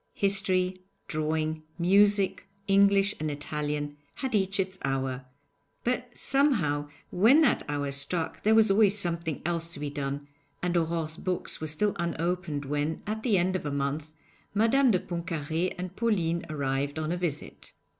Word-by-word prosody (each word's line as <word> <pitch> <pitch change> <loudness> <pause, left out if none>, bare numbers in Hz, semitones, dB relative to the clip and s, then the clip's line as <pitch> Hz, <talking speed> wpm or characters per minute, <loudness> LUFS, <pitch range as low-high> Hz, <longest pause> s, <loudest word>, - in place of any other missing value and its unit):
History, 190 -2 +1 0.3
drawing, 155 0 -1 0.2
music, 200 +2 +3 0.2
English 200 +1 +4
and 155 0 -1
Italian, 145 0 -3 0.2
had 265 -2 -3
each 195 -1 +1
its 190 0 -2
hour; 135 -1 -2 0.6
but 250 0 -1
somehow 175 - +2 0.2
when 230 - +6
that 280 - +3
hour 145 -1 -1
struck 145 +4 -1
there 220 +1 +4
was 220 -2 +5
always 205 0 +5
something 170 -5 -2
else 170 -1 0
to - - -8
be 145 -1 -3
done, 140 0 -4 0.4
and 180 0 0
Aurore's 165 -1 0
books 185 -3 -3
were 155 - -2
still 200 +8 +1
unopened 170 -3 -2
when, 150 +3 -2
at 215 +1 -3
the 220 -4 +2
end 185 +1 +1
of 185 - -2
a 150 - -2
month, 140 +2 -2 0.4
Madame 245 +5 +4
de 200 - +4
Pontcarré 170 -1 -3
and 180 +1 -6
Pauline 175 -8 0
arrived 140 0 -1
on 155 0 -2
a - - 0
visit. 170 -5 -5
170 Hz, 155 wpm, -28 LUFS, 150-195 Hz, 0.6 s, when